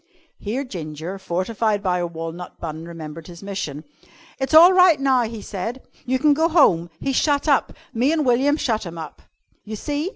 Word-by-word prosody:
Here 235 Hz, +7 st, -3 dB
Ginger, 170 Hz, -, -7 dB
fortified 200 Hz, +3 st, -1 dB
by 180 Hz, -2 st, +1 dB
a 175 Hz, -, -1 dB
walnut 165 Hz, +1 st, -7 dB
bun, 160 Hz, 0 st, -6 dB
remembered 165 Hz, -1 st, -9 dB
his 175 Hz, +1 st, -11 dB
mission. 155 Hz, -7 st, -5 dB, 0.6 s
"It's 270 Hz, +3 st, 0 dB
all 345 Hz, +4 st, +9 dB
right 365 Hz, -5 st, +6 dB
now," 260 Hz, -3 st, +2 dB
he 225 Hz, -1 st, -7 dB
said. 225 Hz, +7 st, -5 dB, 0.2 s
"You 260 Hz, +1 st, +2 dB
can 290 Hz, +3 st, +4 dB
go 320 Hz, +3 st, +2 dB
home. 175 Hz, -, +4 dB
He's 270 Hz, -, -2 dB
shut 290 Hz, +1 st, +1 dB
up. 280 Hz, -3 st, +2 dB, 0.2 s
Me 250 Hz, +5 st, +2 dB
an' 320 Hz, -2 st, +1 dB
William 270 Hz, +3 st, +2 dB
shut 230 Hz, -8 st, -1 dB
him 170 Hz, -2 st, -8 dB
up." 160 Hz, -1 st, -8 dB, 0.4 s
"You 215 Hz, +1 st, -6 dB
see!" 295 Hz, -, -3 dB
220 Hz, 185 wpm, -22 LUFS, 170-280 Hz, 0.6 s, all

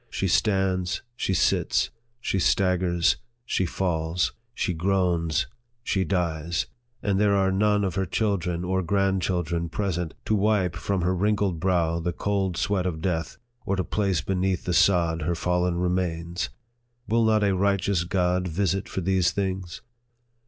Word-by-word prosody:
She 95 Hz, -, -1 dB
stands 95 Hz, -1 st, +1 dB
she 95 Hz, -6 st, -1 dB
sits -, -, +2 dB, 0.3 s
she 100 Hz, -, -1 dB
staggers 90 Hz, -1 st, +2 dB, 0.3 s
she 95 Hz, -6 st, 0 dB
falls 85 Hz, -2 st, -1 dB, 0.2 s
she 90 Hz, -, -1 dB
groans 85 Hz, -3 st, +1 dB, 0.4 s
she 95 Hz, -5 st, +1 dB
dies 85 Hz, -2 st, -1 dB, 0.4 s
and 100 Hz, -2 st, +1 dB
there 100 Hz, -1 st, +4 dB
are 95 Hz, -1 st, +2 dB
none 105 Hz, +1 st, +2 dB
of 95 Hz, -3 st, -1 dB
her 95 Hz, 0 st, -1 dB
chil 105 Hz, +2 st, +1 dB
dren 85 Hz, 0 st, -3 dB
or 95 Hz, +1 st, 0 dB
grandchildren 90 Hz, -3 st, 0 dB
present, 90 Hz, -3 st, -2 dB
to -, -, +1 dB
wipe 100 Hz, -4 st, +2 dB
from 100 Hz, +1 st, -1 dB
her 90 Hz, +2 st, +2 dB
wrinkled 100 Hz, -2 st, +1 dB
brow 85 Hz, -2 st, +1 dB
the 85 Hz, +1 st, -2 dB
cold 95 Hz, -2 st, -1 dB
sweat 95 Hz, -1 st, 0 dB
of 80 Hz, -3 st, -3 dB
death, 80 Hz, -2 st, -2 dB, 0.3 s
or 100 Hz, -, 0 dB
to 95 Hz, -, 0 dB
place 95 Hz, -6 st, 0 dB
beneath 95 Hz, +1 st, -1 dB
the 90 Hz, -, 0 dB
sod 85 Hz, -3 st, +3 dB
her 85 Hz, +3 st, 0 dB
fallen 90 Hz, +1 st, 0 dB
remains. 90 Hz, -1 st, -1 dB, 0.6 s
Will 115 Hz, +2 st, +2 dB
not 110 Hz, -1 st, +3 dB
a 100 Hz, -2 st, +2 dB
right 100 Hz, +1 st, +2 dB
eous 95 Hz, -4 st, +2 dB
God 90 Hz, -1 st, +1 dB
visit 95 Hz, +2 st, -1 dB
for 95 Hz, -, -3 dB
these 95 Hz, 0 st, +2 dB
things 95 Hz, -3 st, -3 dB
90 Hz, 155 wpm, -25 LUFS, 85-95 Hz, 0.6 s, there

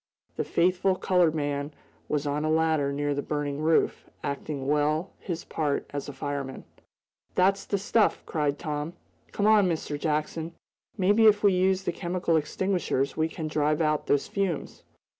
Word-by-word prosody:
The -, -, -1 dB
faithful 185 Hz, +2 st, +2 dB
colored 180 Hz, -4 st, +2 dB
man 145 Hz, -1 st, -2 dB, 0.4 s
was 150 Hz, -1 st, 0 dB
on 145 Hz, +1 st, -1 dB
a 155 Hz, -, 0 dB
ladder 160 Hz, -3 st, +2 dB
near 145 Hz, +1 st, -1 dB
the 145 Hz, -, -2 dB
burning 145 Hz, -1 st, -3 dB
roof, 160 Hz, +1 st, +1 dB
acting 140 Hz, -1 st, -4 dB
well 150 Hz, +5 st, +1 dB
his 170 Hz, -3 st, -5 dB
part 150 Hz, -3 st, -1 dB
as 145 Hz, 0 st, -4 dB
a -, -, -4 dB
fireman. 140 Hz, -1 st, -5 dB, 0.7 s
"That's 195 Hz, +2 st, +3 dB
the 200 Hz, -, 0 dB
stuff!" 210 Hz, +3 st, +2 dB
cried 145 Hz, -3 st, -1 dB
Tom. 150 Hz, +1 st, -4 dB, 0.4 s
"Come 205 Hz, -, -1 dB
on, 210 Hz, -3 st, +5 dB
Mr. 155 Hz, -3 st, -3 dB
Jackson. 155 Hz, +2 st, -2 dB, 0.4 s
Maybe 205 Hz, +3 st, +5 dB
if 210 Hz, -1 st, +4 dB
we 200 Hz, -2 st, +5 dB
use 185 Hz, +1 st, +2 dB
the 175 Hz, -, 0 dB
chemical 175 Hz, -1 st, -1 dB
extinguishers 155 Hz, -4 st, 0 dB
we 160 Hz, 0 st, +1 dB
can 160 Hz, -1 st, -5 dB
drive 150 Hz, 0 st, +1 dB
out 155 Hz, -2 st, +1 dB
those 145 Hz, -, +2 dB
fumes!" 195 Hz, -6 st, -2 dB
155 Hz, 160 wpm, -27 LUFS, 145-185 Hz, 0.7 s, on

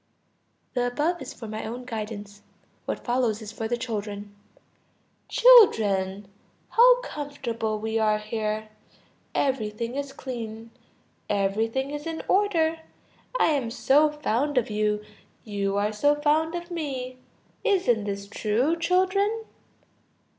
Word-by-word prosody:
The 245 Hz, -2 st, +1 dB
above 305 Hz, +7 st, -1 dB
is 270 Hz, +1 st, -6 dB
for 230 Hz, -, -9 dB
my 215 Hz, 0 st, -5 dB
own 245 Hz, +3 st, -6 dB
guidance; 210 Hz, -3 st, -6 dB, 0.4 s
what -, -, -4 dB
follows 240 Hz, -3 st, +1 dB
is 215 Hz, -2 st, -8 dB
for 220 Hz, 0 st, -4 dB
the 240 Hz, +1 st, -1 dB
children. 205 Hz, -4 st, -5 dB, 0.9 s
"Children, 205 Hz, -, +5 dB, 0.4 s
how -, -, +6 dB
comfortable 260 Hz, -, -4 dB
we 220 Hz, +1 st, -1 dB
are 215 Hz, -1 st, +3 dB
here! 215 Hz, 0 st, -3 dB, 0.7 s
Everything 230 Hz, -3 st, -1 dB
is 280 Hz, -1 st, -3 dB
clean; 230 Hz, -4 st, -7 dB, 0.6 s
everything 220 Hz, +7 st, 0 dB
is 295 Hz, +2 st, -5 dB
in 325 Hz, -1 st, -4 dB
order; 335 Hz, -5 st, +2 dB, 0.6 s
I -, -, +4 dB
am 270 Hz, -6 st, 0 dB
so 290 Hz, +6 st, +4 dB
fond 290 Hz, -1 st, -1 dB
of 230 Hz, -3 st, +1 dB
you; 210 Hz, 0 st, 0 dB, 0.4 s
you 200 Hz, -2 st, -2 dB
are 210 Hz, +1 st, 0 dB
so 290 Hz, +7 st, +3 dB
fond 310 Hz, +3 st, +1 dB
of 345 Hz, +1 st, -6 dB
me. 260 Hz, -6 st, -4 dB, 0.4 s
Isn't 360 Hz, -, +2 dB
this 200 Hz, -1 st, -4 dB
true, 230 Hz, +9 st, +1 dB
children? 380 Hz, +5 st, +1 dB
240 Hz, 125 wpm, -26 LUFS, 215-300 Hz, 0.9 s, how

